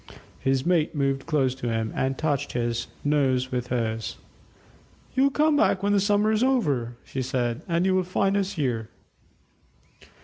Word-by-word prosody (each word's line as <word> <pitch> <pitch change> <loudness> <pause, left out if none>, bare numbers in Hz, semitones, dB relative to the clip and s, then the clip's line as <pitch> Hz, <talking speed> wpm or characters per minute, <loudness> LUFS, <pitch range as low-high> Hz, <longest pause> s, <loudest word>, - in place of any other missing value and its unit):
His 135 0 0
mate 170 -2 +2
moved 135 -1 -1
close 140 -5 +2
to 130 -2 -4
him 115 -1 -1
and 130 0 -1
touched 145 -2 -1
his, 120 -1 -1 0.2
nose 135 -3 +1
with 125 -1 -2
hers. 115 -3 -2 1.0
"You'll 265 +2 +4
come 300 +2 +2
back 240 -10 +2
when 205 0 +2
the 200 - +4
summer 205 +2 +2
is 220 0 +1
over," 145 - +1
she 135 - -4
said, 120 -2 -1
"and 170 +1 +1
you 190 - +3
will 185 - +3
find 195 +2 0
us 200 0 0
here." 125 - -2
140 Hz, 165 wpm, -25 LUFS, 125-190 Hz, 1.0 s, You'll